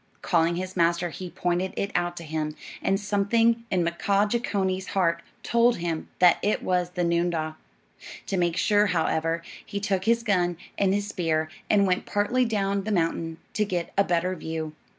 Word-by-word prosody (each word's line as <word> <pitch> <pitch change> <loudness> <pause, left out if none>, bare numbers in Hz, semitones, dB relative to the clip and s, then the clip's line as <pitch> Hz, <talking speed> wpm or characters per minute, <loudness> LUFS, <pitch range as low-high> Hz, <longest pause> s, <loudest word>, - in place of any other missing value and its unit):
Calling 170 -1 +2
his 185 +1 -4
master, 170 0 +2
he 180 +4 -7
pointed 180 +2 -1
it 200 - -1
out 175 0 -1
to 170 - -6
him, 155 -1 -3 0.3
and 195 0 +1
something 225 +3 +2
in 180 -4 +1
Mkaaah 200 +4 +1
Jeechonee's 190 -5 -1
heart 170 -2 +2 0.2
told 235 +1 +3
him 170 -2 -3
that 180 -1 +5
it 210 - 0
was 180 -1 +1
the 180 0 -2
noondah. 170 -2 0 0.7
To 195 - -2
make 175 -1 +1
sure, 210 -1 +3
however, 165 -2 0 0.2
he 200 - -4
took 195 -2 -1
his 230 +1 +3
gun 175 -5 +1 0.2
and 195 -1 +2
his 205 +1 -1
spear 160 -4 0 0.2
and 200 -1 +4
went 180 -1 0
partly 240 +5 +1
down 200 -3 0
the 215 - -3
mountain 165 -3 0 0.2
to 210 - +1
get 180 -4 -3
a 200 - +4
better 180 0 0
view. 160 -2 -5
180 Hz, 175 wpm, -26 LUFS, 170-200 Hz, 0.7 s, that